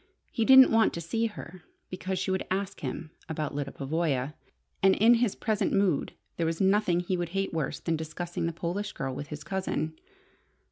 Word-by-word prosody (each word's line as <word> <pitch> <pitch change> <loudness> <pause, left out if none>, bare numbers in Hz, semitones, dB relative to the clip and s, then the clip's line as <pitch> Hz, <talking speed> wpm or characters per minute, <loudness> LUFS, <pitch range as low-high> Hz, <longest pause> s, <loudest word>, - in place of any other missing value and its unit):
He 230 - 0
didn't 265 +1 +9
want 225 0 +4
to - - -3
see 225 +8 -1
her, 185 -4 -10 0.3
because 185 +1 -3
she 190 +1 -1
would 190 - -1
ask 190 +1 -2
him 155 +4 -5 0.2
about 155 -2 -3
Lyda 140 -1 -3
Pavoya, 145 -1 -1 0.5
and 190 0 +5
in 225 +3 +6
his 235 -3 +2
present 215 -2 0
mood 195 -6 +1 0.2
there 165 - 0
was 165 0 -2
nothing 190 -2 +3
he 180 +1 -1
would 175 -1 -2
hate 195 -2 -1
worse 160 -3 -2
than 165 -1 -1
discussing 165 +2 -4
the - - -1
Polish 180 +5 -3
girl 135 -1 -3
with 145 +2 -6
his 150 0 -7
cousin. 185 -5 -2
175 Hz, 190 wpm, -28 LUFS, 160-195 Hz, 0.5 s, didn't